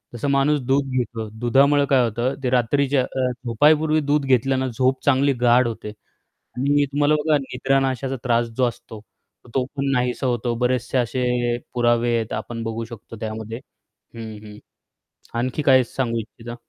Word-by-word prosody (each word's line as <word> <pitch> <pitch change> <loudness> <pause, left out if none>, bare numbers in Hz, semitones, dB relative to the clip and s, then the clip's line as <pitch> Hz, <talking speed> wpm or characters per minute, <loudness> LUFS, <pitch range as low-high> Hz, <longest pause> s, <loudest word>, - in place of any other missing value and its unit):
तसं 130 +5 -3
माणूस 140 +2 +2
दूध 135 0 +1
घेतो 115 -3 -3
दुधामुळं 140 +4 +4
काय 130 -3 +4
होतं 120 +3 -1
ते 125 - +1
रात्रीच्या 130 +2 +2
अ, 130 -1 -2
झोपायपूर्वी 150 +6 +3
दूध 145 -1 +2
घेतल्यानं 130 0 +1
झोप 130 0 +1
चांगली 140 0 +3
गाढ 120 +1 +5
होते 110 -2 -6 0.5
आणि 145 +3 0
तुम्हाला 145 +1 +3
बघा 150 0 +2
निद्रानाशाचा 135 0 -1
त्रास 120 -1 +2
जो 130 - +2
असतो, 110 -1 -10
तर 110 - -27
तो 130 - +1
पण 140 0 -1
नाहीसा 125 +1 0
होतो, 120 -1 -1
बरेचसे 125 +1 0
असे 125 0 0 0.2
पुरावे 120 0 +2
आहेत 115 -1 -3
आपण 115 -1 -5
बघू 115 0 -4
शकतो 115 0 -11
त्यामध्ये 110 +1 -5 0.6
हं, 115 -1 -7
हं. 105 0 -11 0.8
आणखी 130 +5 -1
काय 130 -3 +5
सांगू 120 -1 -2
इच्छिता? 120 +1 -9
125 Hz, 155 wpm, -22 LUFS, 120-135 Hz, 0.8 s, गाढ